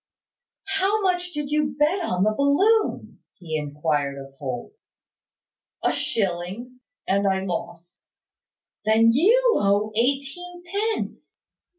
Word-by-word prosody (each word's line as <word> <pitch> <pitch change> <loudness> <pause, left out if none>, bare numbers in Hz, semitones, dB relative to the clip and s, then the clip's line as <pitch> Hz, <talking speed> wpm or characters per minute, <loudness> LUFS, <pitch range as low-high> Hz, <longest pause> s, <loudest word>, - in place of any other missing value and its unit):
"How 395 +2 +1
much 360 -1 0
did 295 -3 -4
you 295 -2 0
bet 310 +6 +2
on 180 - 0
the 215 +1 +2
balloon?" 385 - +2 0.2
he 165 -4 -6
inquired 145 -1 -1
of 135 0 -10
Holt. 130 - -5 1.1
"A - - +3
shilling; 200 +5 -2 0.3
and 200 +1 +2
I 190 0 0
lost." 175 -1 -6 0.8
"Then 220 +2 +5
you 460 - +4
owe 205 +2 +2
eighteen 280 +9 -2
pence." 410 +5 -3
245 Hz, 110 wpm, -24 LUFS, -, 1.1 s, Then